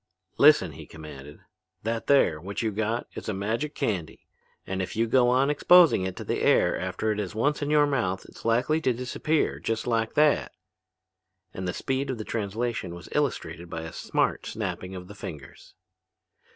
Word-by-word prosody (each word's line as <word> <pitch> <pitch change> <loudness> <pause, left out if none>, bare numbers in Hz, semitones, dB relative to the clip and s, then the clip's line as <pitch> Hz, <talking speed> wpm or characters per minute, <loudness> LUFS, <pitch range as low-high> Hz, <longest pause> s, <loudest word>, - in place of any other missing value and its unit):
"Listen," 145 - +6
he 75 0 -11
commanded, 75 -3 -11 0.4
"that 115 +1 -2
there, 80 - +4
what 100 +5 -4
you 110 - 0
got, 110 +3 -1
is - - -6
a 105 - -1
magic 115 +10 -2
candy, 100 - -3 0.4
and 95 0 -3
if 95 - -4
you 115 +2 +2
go 120 +1 +4
on 130 +3 +3
exposing 165 - +6
it 95 - -5
to - - -6
the - - -2
air - - +4
after 95 +4 -2
it 105 - -2
is 100 -1 -4
once 145 +8 +1
in 145 - -1
your 150 -1 +5
mouth 105 -10 -1
it's - - -14
likely 125 +8 +2
to 130 - +2
disappear, 125 +6 -1
just 115 -1 -2
like 115 -2 0
that." 150 -1 +3 1.0
And 95 0 -4
the - - 0
speed 135 +1 -2
of 130 - -2
the 110 - -5
translation 110 -3 -3
was 85 - -11
illustrated 85 0 -2
by 80 - -5
a 80 - -7
smart - - -1
snapping 90 +1 -4
of 90 -1 -8
the 105 - -10
fingers. 75 -8 -10
110 Hz, 185 wpm, -27 LUFS, 95-130 Hz, 1.0 s, Listen